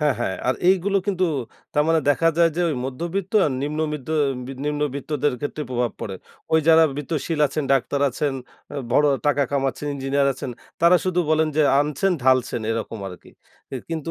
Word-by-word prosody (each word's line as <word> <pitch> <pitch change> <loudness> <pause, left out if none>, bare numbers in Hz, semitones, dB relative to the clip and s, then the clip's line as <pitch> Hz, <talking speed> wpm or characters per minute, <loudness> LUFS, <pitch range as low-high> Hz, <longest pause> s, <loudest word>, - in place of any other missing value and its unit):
হ্যাঁ, 150 -2 +2
হ্যাঁ। 95 -5 -1
আর 130 - +3
এইগুলো 190 +1 +3
কিন্তু 185 -2 +1 0.5
তার 150 - +4
মানে 165 0 +3
দেখা 145 +4 +3
যায় 170 -1 +5
যে - - 0
ঐ - - 0
মধ্যবিত্ত 170 +9 -4
আর 145 - -1
নিম্নমিত্ত 150 -1 -3 0.6
নিম্নবিত্তদের 145 -1 -1
ক্ষেত্রে 145 +1 -4
প্রভাব 120 -1 0
পড়ে। 100 - -4 0.4
ওই 160 - +5
যারা 165 0 +7
বিত্তশীল 155 +2 -3
আছেন, 150 +1 -3
ডাক্তার 135 +1 +1
আছেন, 145 +3 -1 0.4
আ - - -7 0.2
বড় 150 +3 +4 0.2
টাকা 145 -1 +3
কামাচ্ছেন, 140 +1 -1
ইঞ্জিনিয়ার 140 +1 0
আছেন 130 0 -6 0.3
তারা 170 +2 +6
শুধু 180 -1 +1
বলেন 155 0 +3
যে, 155 - +5 0.2
"আনছেন, 150 +6 0
ঢালছেন।" 130 -2 +2
এরকম 115 0 -3
আরকি। 90 - -13 0.4
এ - - -3 0.2
কিন্তু 165 0 -3
150 Hz, 170 wpm, -23 LUFS, 135-165 Hz, 0.6 s, যারা